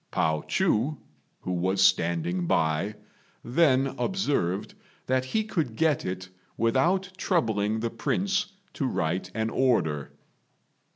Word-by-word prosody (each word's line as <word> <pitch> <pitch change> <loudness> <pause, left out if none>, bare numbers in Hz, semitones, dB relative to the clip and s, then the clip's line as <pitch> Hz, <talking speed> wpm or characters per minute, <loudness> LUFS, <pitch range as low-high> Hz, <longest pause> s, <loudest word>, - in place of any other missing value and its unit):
Pao 80 -1 +1
chu, 155 - +1 0.4
who 90 - -4
was 95 +2 0
standing 85 -1 +2
by, 80 +7 +1 0.5
then 135 0 +3
observed 120 - -1 0.3
that 130 0 +1
he 215 +12 0
could 160 - -2
get 155 +1 +2
it 90 0 -4 0.3
without 170 - +2
troubling 110 - 0
the 115 0 -1
Prince 195 - -1 0.2
to 135 - -1
write 90 -4 -1
an 110 0 -1
order. 80 - +1
115 Hz, 115 wpm, -27 LUFS, 90-150 Hz, 0.5 s, then